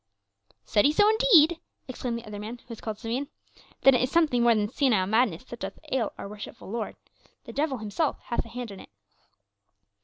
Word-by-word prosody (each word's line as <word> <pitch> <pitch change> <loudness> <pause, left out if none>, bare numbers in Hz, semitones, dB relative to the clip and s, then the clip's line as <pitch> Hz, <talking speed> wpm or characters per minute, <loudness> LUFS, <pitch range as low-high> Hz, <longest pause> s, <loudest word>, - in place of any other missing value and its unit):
"Said 205 - +3
he 290 - +5
so 415 +7 +4
indeed?" 395 -8 +5 0.3
exclaimed 250 -2 -3
the 235 - -9
other 210 -1 -7
man, 220 +4 -6
who - - -26
was 230 - -8
called 215 -2 -4
Simeon. 245 +5 -3 0.5
"Then 270 - +7
is 255 +1 +2
it - - -15
something 310 -8 +3
more 235 -1 +5
than 210 -1 +1
senile 230 -5 +2
madness 220 -1 +1
that 240 -2 -10
doth - - -6
ail 245 -5 0
our - - -6
worshipful 205 -1 -9
lord; 230 -1 -3 0.5
the - - -10
devil 285 -2 0
himself 220 +8 -2
hath 235 - -2
a 230 - -13
hand 240 -1 -6
in 195 - -10
it." - - -13
240 Hz, 205 wpm, -27 LUFS, 215-280 Hz, 0.5 s, Then